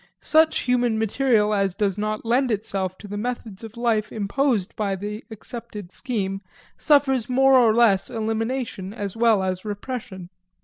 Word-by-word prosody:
Such 315 0 +3
human 245 -3 +1
material 220 -1 +2
as 195 -3 0
does 200 -3 0
not 215 +1 -3
lend 250 +3 +2
itself 195 -4 -2
to 205 - -11
the 205 +1 -5
methods 230 -3 -5
of 225 +1 -10
life 225 -3 0
imposed 215 -1 0
by 200 -2 -1
the 210 +3 -6
accepted 220 -3 -8
scheme 195 -6 -3 0.3
suffers 270 -6 +2
more 270 +1 +4
or 245 -4 +6
less 220 -4 +3
elimination 225 -2 -3
as 200 -4 -5
well 225 -4 +3
as 185 -1 -2
repression. 205 -4 -6
220 Hz, 150 wpm, -23 LUFS, 200-245 Hz, 0.3 s, or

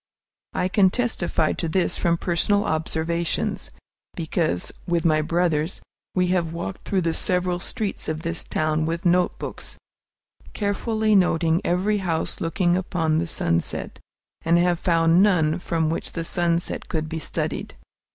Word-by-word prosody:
I 180 - 0
can 190 0 +4
testify 185 -8 0
to 165 - -3
this 180 +2 0
from 170 -1 +2
personal 190 +4 +1
observations, 160 +1 -1 0.5
because, 160 - -1 0.2
with 170 -1 0
my 155 -1 +4
brothers, 165 0 0 0.4
we 180 -1 +2
have 175 -3 +1
walked 170 +3 -6
through 195 -2 +1
the 165 -1 0
several 180 0 +1
streets 210 -1 -3
of 155 +1 -3
this 170 0 -2
town 155 0 0
with 165 +2 -3
notebooks, 180 +1 0 0.8
carefully 215 +1 0
noting 170 -2 +3
every 195 +4 +1
house 165 -4 -2
looking 175 +1 +1
upon 165 -4 0
the 170 - -1
sunset, 85 - -1 0.4
and 170 +1 +4
have 175 -1 +2
found 165 0 +4
none 175 -5 +3
from 165 -2 0
which 165 - -4
the 165 - -3
sunset 170 0 -1
could 155 -1 -2
be 160 0 -4
studied. - - -3
170 Hz, 140 wpm, -24 LUFS, 160-180 Hz, 0.8 s, can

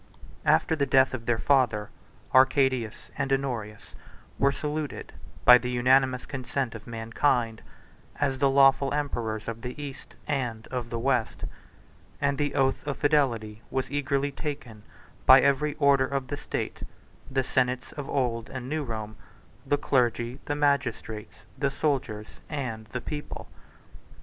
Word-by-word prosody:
After 160 - +4
the 140 -2 0
death 130 0 +4
of 115 -3 -5
their 120 -1 +2
father, 120 -6 +2 0.4
Arcadius 130 -3 +3
and 135 -1 -1
Honorius 120 -6 -3 0.5
were 140 0 +4
saluted, 150 0 -4 0.3
by 125 0 +10
the 125 - -4
unanimous 130 +1 +3
consent 130 -2 -3
of 110 -1 -10
mankind, 115 0 0 0.6
as 135 -2 0
the 140 - +4
lawful 135 0 +5
emperors 115 -7 -2
of 115 0 -5
the 125 +4 -6
East, 140 -2 -8
and 120 -6 -2
of 125 -2 -4
the 115 - -3
West; 120 -1 0 0.8
and 140 0 0
the 145 -1 -1
oath 135 +2 +1
of 140 - -2
fidelity 120 -8 +1
was 130 0 -2
eagerly 140 0 0
taken 140 -8 -6 0.5
by 130 +1 +10
every 140 +2 +2
order 140 -3 +4
of 135 -1 -3
the - - -2
state; - - -4 0.5
the 135 -1 0
senates 125 0 0
of 145 -2 -7
old 120 -4 -1
and 130 -1 -6
new 155 +2 -2
Rome, 110 -4 -5 0.5
the 145 - +3
clergy, 120 -2 0
the 145 - -1
magistrates, 135 -7 -1
the 140 -1 +2
soldiers, 130 -7 -1 0.2
and 120 -7 -4
the 125 +4 -5
people. 150 +3 -6
130 Hz, 145 wpm, -27 LUFS, 115-140 Hz, 0.8 s, by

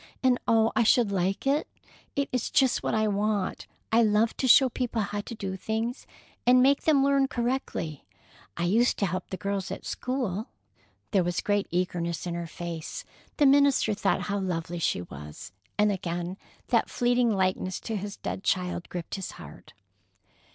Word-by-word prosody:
"And, 255 -1 +4
oh, 225 0 +4
I - - +4
should 230 -1 +4
like 190 +3 -1
it! 280 +3 +1 0.5
It 280 0 0
is 250 -2 -1
just 265 -2 +3
what - - -1
I 215 0 +2
want. 205 -1 -1 0.2
I 230 +1 +5
love 215 +1 +3
to 260 - 0
show 265 +2 +7
people 240 -3 -2
how 205 +1 -3
to 230 - -8
do 195 -3 -4
things, 225 +5 -3 0.4
and 250 +1 +6
make 275 +1 +3
them 290 -4 +4
learn 275 -1 +3
correctly. 240 - -3 0.5
I 170 - -1
used 225 +8 +3
to 200 - +1
help 185 0 -3
the 190 - -4
girls 200 -1 -2
at - - -6
school." 245 -5 -2 0.6
There 195 -4 +3
was 175 0 -1
great 205 -1 0
eagerness 175 -1 -2
in 175 - -3
her 170 0 -4
face. 170 -1 -6 0.3
The 295 - +4
minister 280 -5 +4
thought 205 - 0
how 200 0 -2
lovely 175 -2 -3
she 90 - 0
was, 75 +4 -10 0.3
and 210 0 +4
again 175 -2 -3 0.3
that - - +2
fleeting 245 0 +2
likeness 185 -2 0
to 225 - -4
his 205 0 -5
dead 190 - -5
child 180 -1 -1
gripped 175 -2 -6
his 195 -2 -4
heart. - - -12
205 Hz, 175 wpm, -27 LUFS, 180-245 Hz, 0.6 s, show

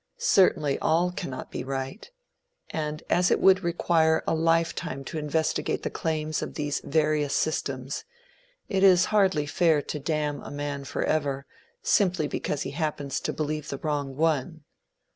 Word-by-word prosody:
Certainly 150 -7 +3
all 170 +3 +2
cannot 135 -7 -6
be - - -4
right; 135 - -5 0.6
and 155 0 -3
as 180 +1 +3
it - - +3
would 190 0 +5
require 165 -2 +2
a - - +1
life 165 +1 +2
time 135 +1 -5
to 155 +4 -5
investigate 155 +1 -1
the - - -2
claims 155 -1 -2
of - - -5
these 145 -1 -2
various 150 -1 +1
systems, 135 -3 -2 0.6
it 190 -2 0
is 185 -2 +6
hardly 190 -8 +3
fair 160 +1 +3
to 150 - -4
damn 150 0 -1
a - - -8
man 145 -1 -4
forever, 140 -1 -1 0.4
simply 180 -6 +2
because 145 0 -2
he - - -5
happens 145 -2 -2
to - - -2
believe 155 -1 -3
the 140 - -3
wrong 145 -2 -2
one. 160 +1 0
155 Hz, 155 wpm, -27 LUFS, 145-165 Hz, 0.6 s, is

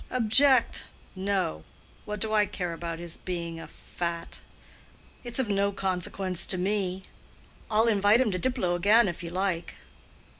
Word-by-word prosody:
"Object? 255 +2 +4 0.3
no. 190 - -1 0.4
What 210 -1 -4
do 220 +1 -1
I 210 -1 +4
care 180 -3 -4
about 165 0 -5
his 170 0 -6
being 170 -2 -5
a - - -8
fat? 170 -1 -6 0.8
It's 240 -2 -5
of 260 -3 0
no 200 0 +1
consequence 185 -1 -1
to 185 - 0
me. 190 0 -1 0.7
I'll 220 +2 +3
invite 205 0 +4
him 255 -5 +2
to 185 - -2
Diplow 245 -6 0
again 205 +6 +4
if 175 -1 -4
you 170 - -5
like." 180 -1 -2
195 Hz, 150 wpm, -28 LUFS, 175-215 Hz, 0.8 s, Object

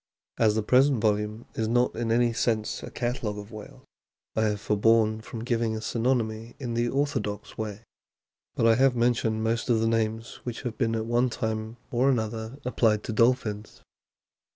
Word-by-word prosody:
As 110 -2 +4
the 110 - 0
present 130 +3 +4
volume 105 +1 0
is 110 - -1
not 120 +2 +2
in 115 -1 -1
any 120 0 +3
sense 110 -2 -1
a - - -7
catalogue 120 -4 -3
of 105 +2 -9
whales, 110 -2 -11 0.5
I 110 - +2
have 105 -1 0
forborne 110 +1 +2
from 115 0 -7
giving 115 -2 0
a - - -3
synonymy 115 -1 -1
in 120 -4 -4
the 120 +1 +1
orthodox 125 -7 -2
way; 110 0 -5 0.7
but - - +1
I 115 - +6
have 130 +2 +3
mentioned 115 -2 +1
most 115 +2 -1
of 115 -2 +4
the 115 - +1
names 115 0 -1
which 120 -2 -5
have 120 -3 -4
been 115 -2 +1
at 110 0 -2
one 120 +2 +2
time 110 0 -3
or 125 +3 +3
another 110 0 -2
applied 110 -4 +2
to 110 - -4
dolphins. 110 -2 0
115 Hz, 175 wpm, -27 LUFS, 110-120 Hz, 0.7 s, I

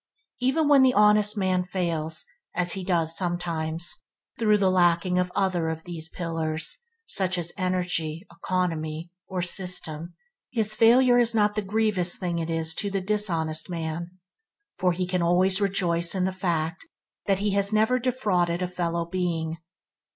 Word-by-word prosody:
Even 265 +5 +1
when 285 -2 +6
the 260 -1 +4
honest 210 0 +4
man 185 -2 +1
fails 170 -4 -3
– - - -38
as 175 0 +1
he 190 +1 -3
does 165 -3 +1
sometimes, 170 -2 -3 0.4
through 215 -2 +3
lacking 180 -2 +2 0.2
other 180 -4 0
of 160 0 -5
these 165 -2 -6
pillars, 160 -2 -2 0.3
such 185 - +1
as 175 -1 -2
energy, 180 -3 -2
economy, 170 -2 -3 0.2
or 185 -2 -3
system 175 -3 -2 0.3
his 220 -3 +1
failure 245 +3 +5
is 235 -1 +2
not 210 -1 +2
the 215 - -2
grievous 200 -3 +1
thing 175 -2 -3
it 165 0 -4
is 165 0 +2
to 200 - -1
the 195 0 -2
dishonest 180 -6 +3
man, 165 0 -4 0.7
for 185 -1 +1
he 180 +1 -2
can 180 0 -2
always 185 +3 +2
rejoice 175 -3 +1
in 185 -1 0
the 190 - -2
fact 165 -3 -2 0.4
that 195 -1 +2
he 205 +1 -1
has 200 +1 +3
never 220 +4 +2
defrauded 185 -9 0
a - - -1
fellow 170 -1 -3
being. 165 -2 -3
180 Hz, 155 wpm, -25 LUFS, 170-200 Hz, 0.7 s, when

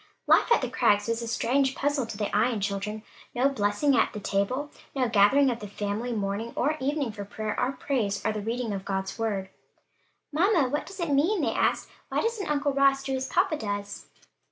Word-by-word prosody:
Life - - +4
at 470 - +5
the - - 0
Crags 225 -5 +3
was 230 0 -1
a 230 - -4
strange 265 +4 +1
puzzle 285 -3 0
to 210 - -7
the 205 -1 -2
Ion 225 +1 +2
children: 200 +2 -3 0.3
no 255 +3 +3
blessing 255 +3 +1
asked - - +4
at - - -16
the 210 - -5
table, 230 +10 -1 0.2
no 260 -2 +1
gathering 230 +6 +5
of 235 - -4
the 210 - -7
family 205 +4 -3
morning 210 +1 -2
or 295 +4 +1
evening 280 -2 -1
for 205 -1 -7
prayer 215 +1 -4
or 250 +2 0
praise 220 -9 -1
or 220 - +2
the 210 - -3
reading 230 +1 -2
of 195 -1 -4
God's 190 +2 -3
word. 200 -4 -2 0.8
"Mamma, 335 -4 +3
what 295 +3 -2
does 390 - -10
it 340 -4 -1
mean?" 335 +8 +2
they - - 0
asked; - - +1 0.2
"why - - 0
doesn't 455 -5 -2
Uncle 285 -1 +1
Ross 275 0 +3
do 270 -1 -2
as 265 0 -3
papa 360 +2 +2
does?" 205 -3 -5
240 Hz, 210 wpm, -27 LUFS, 205-280 Hz, 0.8 s, at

